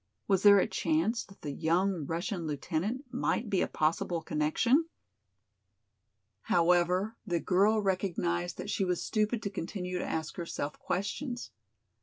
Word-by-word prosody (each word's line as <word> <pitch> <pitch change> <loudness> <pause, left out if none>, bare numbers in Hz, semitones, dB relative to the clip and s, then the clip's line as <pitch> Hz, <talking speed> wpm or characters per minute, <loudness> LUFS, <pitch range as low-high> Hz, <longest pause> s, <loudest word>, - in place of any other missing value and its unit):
Was 195 -2 +3
there 205 0 +8
a 190 - +4
chance 170 +9 0
that 195 - -18
the 145 - -3
young 170 +1 0
Russian 170 +1 -2
lieutenant 175 - -2
might 225 -2 -1
be 190 - +2
a - - +1
possible 165 +2 0
connection? 235 - +2 1.5
However, 180 - +2
the 175 -5 -1
girl 200 +5 +3
recognized 175 -3 -1
that 205 - -4
she 200 - 0
was 180 -2 0
stupid 215 +1 0
to 200 - -2
continue 180 -1 -4
to - - -2
ask 160 -1 -3
herself 160 -4 -4
questions. 240 +7 -3
180 Hz, 140 wpm, -31 LUFS, 165-205 Hz, 1.5 s, there